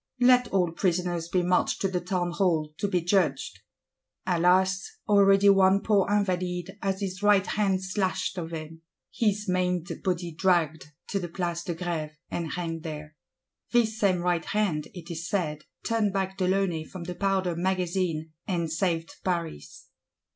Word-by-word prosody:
Let 250 0 +5
all 180 -5 +1
prisoners 175 -1 -1
be 180 0 +1
marched 180 +1 +1
to 195 - +2
the 180 -2 -2
Townhall, 175 -3 0
to 205 - 0
be 185 -3 +1
judged!—Alas, 180 +2 0 0.2
already 200 -1 +5
one 195 0 +5
poor 205 -3 +2
Invalide 185 -2 -1
has 195 0 -1
his 190 0 -4
right 205 -2 +4
hand 195 -3 0
slashed 190 -1 -1
off 165 -1 -5
him; 160 0 -7 0.3
his 210 -2 0
maimed 180 -1 0
body 175 -2 -1
dragged 165 -3 +1 0.2
to 200 - 0
the 175 -2 -5
Place 170 -1 -2
de 175 - -3
Grève, 160 -3 -3 0.2
and 170 -2 -3
hanged 165 -2 -3
there. 155 -1 -7 0.6
This 220 -2 +2
same 185 -4 +2
right 175 -1 0
hand, 195 -8 0
it 175 -1 -8
is 170 +1 -5
said, 155 -6 -2 0.2
turned 220 -3 +1
back 190 -1 -1
de 185 -2 0
Launay 185 -4 +1
from 175 +2 -9
the 180 +1 -5
Powder 190 -2 0
Magazine, 175 -3 -1 0.2
and 170 -4 -1
saved 165 -1 -1
Paris. 165 - -4
180 Hz, 155 wpm, -27 LUFS, 170-195 Hz, 0.6 s, Let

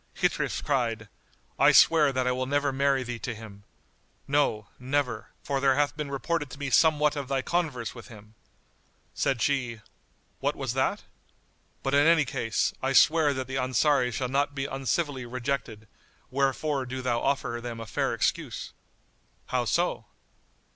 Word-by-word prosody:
Ghitrif - - 0
cried, 115 -6 -1 0.5
"I - - +7
swear 155 -4 +6
that 130 -1 -1
I 125 - +2
will 130 +1 -2
never 145 0 +1
marry 135 0 +1
thee 120 -1 -5
to 120 0 -4
him; 105 -2 -12 0.6
no, 135 -7 +1
never, 125 -3 -2
for 140 -1 -1
there 135 -1 +3
hath 145 +1 +1
been 150 -2 -4
reported 145 +2 -2
to 135 - -10
me 140 -2 -4
somewhat 150 -1 +4
of 140 -2 -4
thy 135 -1 -1
converse 150 -10 -2
with 120 -1 -11
him." 110 -2 -14 0.8
Said 130 -3 0
she, 125 -5 0 0.6
"What - - 0
was - - -3
that? - - 0 0.8
But 135 - -1
in 145 +2 +5
any 165 -3 +5
case, 115 -2 -1
I 135 +1 0
swear 155 +1 +5
that 130 0 -3
the 130 +1 -4
Ansaris 130 0 +2
shall 130 - -1
not 140 +2 0
be 135 -1 -2
uncivilly 135 0 -2
rejected; 120 -3 -4 0.4
wherefore 135 0 0
do 130 +1 -5
thou 120 -2 0
offer 135 -4 -1
them 120 -1 -6
a 115 - -6
fair - - -1
excuse." - - -2 0.8
"How - - 0
so?" - - 0
135 Hz, 160 wpm, -27 LUFS, 120-145 Hz, 0.8 s, I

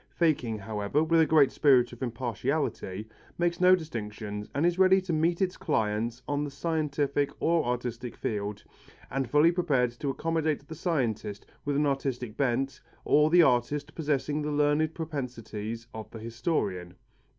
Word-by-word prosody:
Faking, 140 -10 +1
however, 105 +7 -1
with 165 +1 +4
a 160 - +4
great 150 -4 +5
spirit 130 -5 +4
of 120 - -12
impartiality, 120 -3 -2 0.3
makes 175 0 0
no 185 0 +7
distinctions 105 - -6
and 145 +4 +2
is 175 +1 +1
ready 190 0 +6
to 185 -2 -3
meet 170 +4 +2
its 185 -1 -2
clients 115 - -1
on 145 0 0
the 145 - -3
scientific 145 -2 -1
or 165 0 +2
artistic 120 0 -3
field, 105 -1 -3 0.5
and 135 -2 -1
fully 150 +5 +5
prepared 145 -9 +1
to 130 +4 -4
accommodate 155 0 -1
the - - -7
scientist 120 - -2 0.2
with 145 0 0
an 150 +1 +2
artistic 135 -5 -2
bent 135 0 0 0.2
or 150 +1 +4
the 175 +1 +7
artist 140 +2 +1
possessing 150 -1 -1
the 150 - -2
learned 150 +2 +2
propensities 115 -8 -5
of 110 -1 -7
the 115 - -9
historian. 110 - -2
140 Hz, 155 wpm, -28 LUFS, 115-160 Hz, 0.5 s, no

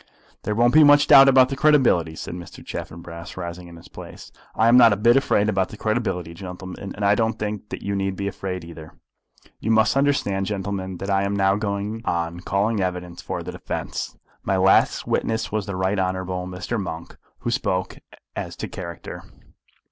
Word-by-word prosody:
"There 105 - -2
won't 120 +2 +3
be 155 +1 +8
much 145 0 +6
doubt 135 0 +8
about 130 -1 +6
the 135 - -3
credibility," 130 - +3
said - - -6
Mr. 85 -1 -10
Chaffanbrass, 85 +1 -8
rising 85 0 -6
in 85 - -12
his 85 - -14
place. - - -11 0.2
"I 110 - +3
am 120 - +6
not 120 -2 +8
a - - -2
bit 120 +4 +4
afraid 120 -6 +2
about 95 -3 0
the 110 - -10
credibility, 95 -7 -2
gentlemen; 95 +1 -8
and 100 - -2
I 100 - +5
don't 110 +1 0
think 105 -1 -4
that - - -7
you 100 0 -2
need 95 -1 -1
be 100 +1 -3
afraid 90 -3 -5
either. 80 -2 -11 0.7
You 110 - -3
must 110 +1 +3
understand, 135 -9 +1
gentlemen, 95 -2 -4
that 100 +2 -4
I 95 0 +2
am 100 +1 -1
now 95 0 +3
going 105 +1 -3
on 85 -2 -2
calling 100 +3 0
evidence 90 -2 -4
for - - -5
the - - -6
defence. - - -5 0.2
My 95 - 0
last 95 +1 +3
witness 110 0 -1
was 105 -1 -2
the 100 - -4
Right 95 +2 0
Honourable 95 -1 -2
Mr. 90 +5 -4
Monk, 85 -3 -7 0.3
who - - -2
spoke 90 0 -2 0.4
as - - -5
to - - -5
character. 85 -3 -8
100 Hz, 195 wpm, -23 LUFS, 90-110 Hz, 0.7 s, be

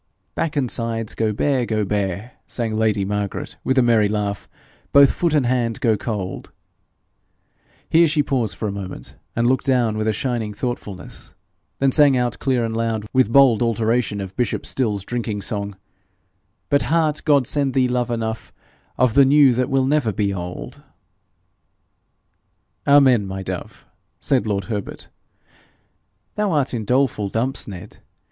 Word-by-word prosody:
'Back 160 - -2
and 130 -5 0
sides 115 -2 -3
go 110 -1 0
bare, 130 +4 0
go 110 -3 -1
bare,' 100 +3 -2 0.2
sang 115 -3 -3
lady 110 -2 +1
Margaret 105 0 -3
with 130 - 0
a 130 - +5
merry 110 -4 +3
laugh; 105 -2 -3 0.4
'Both 140 -1 +7
foot 170 -3 0
and 145 -4 +2
hand 120 -2 0
go 115 -3 +2
cold;' 100 -3 -5 1.4
here 165 +1 +5
she 150 -1 +1
paused 125 -7 -1
for 110 - -2
a - - -2
moment, 95 -10 -7 0.2
and 115 - +1
looked 130 +3 +1
down 120 -5 +2
with 110 - -1
a - - +3
shining 110 -2 -3
thoughtfulness; 105 -5 -6 0.4
then 135 0 +2
sang 145 -2 +5
out 125 -1 -1
clear 130 -4 0
and 115 0 -3
loud, 115 -2 -1
with 130 -4 +3
bold 130 -4 +5
alteration 115 -1 0
of 95 -1 -6
bishop 125 -2 -1
Stills' 105 -7 -1
drinking 110 -4 -3
song, 100 -1 -4 0.9
'But, 140 - +3
heart, 155 -2 +1
God 140 -4 +3
send 140 0 0
thee 130 -1 +3
love 125 -1 -1
enough, 110 -1 -3 0.5
Of 125 -2 +3
the 140 +2 +6
new 140 -1 +5
that 125 +2 -1
will 135 -1 +2
never 140 -5 +1
be 100 -1 -1
old.' 90 -9 -7 2.1
'Amen, 130 -7 +5
my 95 0 -5
dove!'said 130 +5 -4
lord 100 -2 -1
Herbert. 100 +1 -6 1.2
'Thou 210 -2 -1
art 145 -4 0
in 115 -3 -3
doleful 125 -4 +1
dumps, 125 +6 -1
Ned. 95 -4 -9
115 Hz, 155 wpm, -21 LUFS, 105-130 Hz, 2.1 s, Both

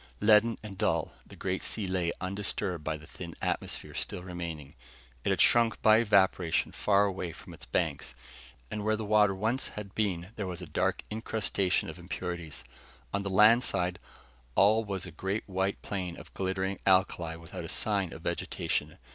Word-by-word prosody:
Leaden 110 +2 +5
and 100 -3 -8
dull, - - +1
the - - -12
great 95 0 -2
sea 105 - -2
lay 90 -2 0
undisturbed 95 -2 -1
by 80 0 -2
the 75 - -13
thin 85 0 -9
atmosphere - - -2
still 90 - -4
remaining. 85 -5 -6 0.5
It - - 0
had - - +1
shrunk 115 -2 +5
by 110 0 +7
evaporation 95 -6 +3
far 100 0 +3
away 95 -3 -3
from - - -12
its - - -10
banks, - - -1 0.6
and 105 -1 -3
where 110 +1 +2
the 110 0 -4
water 105 -2 +4
once 110 +7 0
had 100 -2 -7
been 95 -4 -1
there 100 - -2
was 90 -1 -5
a 90 - -6
dark 75 - 0
incrustation 105 -4 0
of - - -8
impurities. 85 -4 -5 0.5
On 100 - +1
the 100 - -3
land 105 +5 +6
side, 90 -4 0 0.6
all 110 +3 +5
was 100 -3 -3
a 90 - -8
great 95 +6 -3
white 95 0 -1
plain 90 -4 -4
of - - -12
glittering 95 +1 -2
alkali 95 -3 +3
without 85 -1 -8
a - - -6
sign 100 -5 +1
of - - -10
vegetation. - - -2
95 Hz, 175 wpm, -30 LUFS, 90-105 Hz, 0.6 s, by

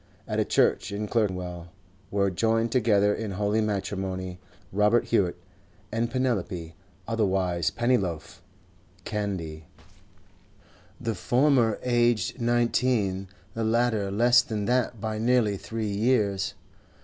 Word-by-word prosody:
At 110 -1 -1
a - - +4
church - - +2
in 105 +1 -3
Clerkenwell 90 -6 -2 0.4
were 100 -1 +1
joined 115 +4 +1
together 105 -4 +3
in 110 -3 -4
holy 105 +3 +1
matrimony 95 -3 -3 0.3
Robert 105 +4 +3
Hewett 95 -6 +1 0.5
and 115 +2 0
Penelope 100 -10 -2 0.3
(otherwise 95 -6 +1
Pennyloaf) 100 -6 -1 0.6
Candy, 90 -7 -4 1.3
the 115 - -2
former 120 +2 +2
aged 120 -3 +1
nineteen, 115 -5 +1 0.3
the 115 - -2
latter 110 -2 +1
less 120 +4 +5
than 110 -4 -3
that 120 -1 0
by 110 0 -3
nearly 115 -3 +2
three 105 +2 -4
years. 100 -2 +1
105 Hz, 110 wpm, -26 LUFS, 95-115 Hz, 1.3 s, less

